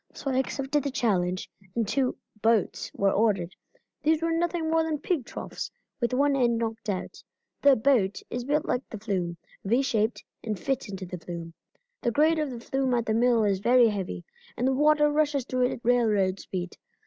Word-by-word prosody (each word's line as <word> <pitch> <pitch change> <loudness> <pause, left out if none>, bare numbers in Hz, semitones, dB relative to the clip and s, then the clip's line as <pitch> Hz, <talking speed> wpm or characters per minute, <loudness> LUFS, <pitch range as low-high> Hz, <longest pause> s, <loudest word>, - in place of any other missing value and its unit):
So 275 - -3
I 260 - +2
accepted 275 +2 -1
the 280 - -1
challenge, 185 -8 0 0.3
and 230 -3 0
two 260 +3 0 0.2
'boats' 225 -3 +1
were 195 0 +2
ordered. 195 -5 +1 0.5
These 315 +1 +2
were 330 - +1
nothing 335 0 0
more 325 0 +3
than 320 -1 -1
pig 295 -3 -1
troughs, - - -6 0.3
with 235 -1 0
one 280 +2 +3
end 240 -3 +2
knocked 225 -1 -3
out. 185 -2 -4 0.4
The 280 -1 +7
'boat' 220 -5 +2
is 245 0 -3
built 295 +4 0
like 250 - 0
the 220 - -6
flume, 185 -5 -2 0.3
V 235 +7 +2
shaped, 220 -3 0 0.2
and 215 -3 -2
fits 270 +2 -2
into 195 -1 -6
the 180 0 -7
flume. 165 0 -7 0.5
The - - +1
grade 310 +6 +3
of 305 -2 -1
the 245 -2 -6
flume 260 +1 0
at 235 -1 0
the 220 - 0
mill 235 0 +3
is 200 -2 +1
very 240 +2 +5
heavy, 185 - -4 0.3
and 250 - +1
the 265 - +3
water 295 +1 +4
rushes 295 -3 +1
through 255 -1 +1
it - - -3
at - - -8
railroad 210 -6 +2
speed. 180 -2 -5
240 Hz, 195 wpm, -27 LUFS, 205-280 Hz, 0.5 s, The